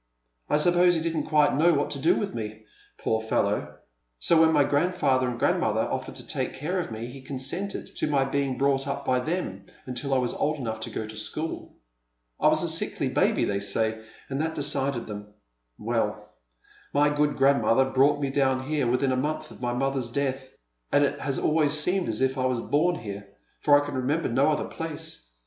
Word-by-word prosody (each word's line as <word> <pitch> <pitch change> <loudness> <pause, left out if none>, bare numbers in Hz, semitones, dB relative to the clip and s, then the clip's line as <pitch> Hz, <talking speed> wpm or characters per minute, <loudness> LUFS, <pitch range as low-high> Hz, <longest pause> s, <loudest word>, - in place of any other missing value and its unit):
I - - +3
suppose 175 +2 +4
he 160 - 0
didn't 165 -1 -1
quite 150 -2 +3
know 165 +3 +4
what 145 - 0
to 140 - -3
do 160 +6 +3
with 200 - -2
me, 110 -1 -6 0.3
poor 110 0 0
fellow, 110 - -1 0.4
so 160 - +3
when 160 0 +5
my 150 -2 +4
grandfather 145 -4 +1
and 120 - -4
grandmother - - +1
offered - - -3
to - - -9
take - - -3
care 170 +7 -2
of 165 - -4
me 110 +1 -5
he 130 +3 -9
consented 135 +9 -4
to - - +1
my 140 -2 +2
being 135 -1 -1
brought 135 0 +1
up 140 0 -3
by 125 0 +2
them 125 - -3 0.2
until 130 +2 -2
I - - +4
was 125 -2 0
old 155 +1 0
enough 110 -5 -4
to 110 - -5
go 110 - -4
to 110 0 -8
school. 155 +9 -5 0.6
I - - +4
was - - +4
a - - 0
sickly - - 0
baljy, - - +2
they 100 -1 0
say, 110 +2 -1 0.2
and 135 +1 -2
that 160 0 -2
decided 140 -4 -1
him. 105 0 -8 0.4
Well, - - -2 0.6
my 145 +1 +5
good 145 0 +1
grandmother 135 -2 +4
brought 135 +2 +3
mo 135 - 0
down 130 -1 +1
here 145 -3 0
within 125 +2 +1
a - - +1
month 150 +4 -2
of - - -13
my 120 -1 -1
mother's 135 -1 -1
death, 135 0 -2 0.4
and 145 - +4
it 145 0 0
has 135 -1 -2
always 150 -2 +2
seemed 180 -2 +1
as 110 +2 -1
if 130 0 +1
I 130 - +1
was 125 -2 0
born 150 +9 +1
here, 100 -6 -7 0.3
for 145 -1 +5
I 145 - -3
can 145 - -5
remember 140 +5 0
no 130 +5 +3
other 150 - 0
place. 150 - -7
135 Hz, 205 wpm, -26 LUFS, 125-150 Hz, 0.6 s, when